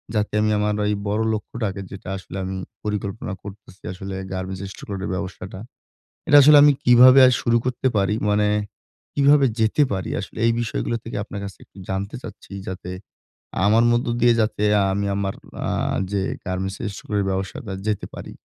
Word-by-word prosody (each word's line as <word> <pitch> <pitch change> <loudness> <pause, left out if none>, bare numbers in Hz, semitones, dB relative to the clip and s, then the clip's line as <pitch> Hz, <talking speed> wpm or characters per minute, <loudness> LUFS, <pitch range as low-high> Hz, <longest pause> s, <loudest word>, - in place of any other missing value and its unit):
যাতে 105 0 0
আমি 110 0 +2
আমার 105 0 +1
ঐ - - +1 0.2
বড় 105 +2 0
লক্ষ্যটাকে 105 -2 -4
যেটা 95 -1 -8
আসলে 95 0 -8
আমি 95 +1 -4 0.3
পরিকল্পনা 105 -1 -3
করতেছি 100 -1 -12
আসলে 95 +1 -6 0.2
গার্মেন্টস 95 0 -4
stock - - -12
lot 95 -1 -4
এর - - -4
ব্যবসাটা। 95 0 -6 0.7
এটা 145 - +6
আসলে 150 +2 +8
আমি 145 0 +7
কিভাবে 125 +2 +8
আর 125 - +4
শুরু 120 0 +2
করতে 130 +1 0
পারি, 100 +1 +2
মানে 105 0 +2 0.7
কিভাবে 140 0 +5
যেতে 110 +7 +3
পারি 95 -2 -3
আসলে - - -9
এই 115 - +4
বিষয়গুলো 115 0 -2
থেকে 115 - -6
আপনার 100 -1 -7
কাছে 100 -1 -8
একটু - - -29
জানতে 95 +2 -3
চাচ্ছি? 105 -2 -11 0.2
যাতে 90 -1 -6 0.8
আমার 110 +3 +5
মধ্য 120 +1 +1
দিয়ে 120 -1 +5
যাতে 110 -1 0 0.3
আমি 100 +1 -1
আমার 100 -1 -2 0.3
আ - - -1 0.4
যে 100 - +1 0.3
গার্মেন্টস 95 +1 -3 0.2
stock - - -11
lot 105 - +2
এর 100 - -1
ব্যবসাটা 95 +2 -4 0.2
যেতে 105 -2 -1
পারি। - - -8
105 Hz, 175 wpm, -22 LUFS, 95-115 Hz, 0.8 s, আসলে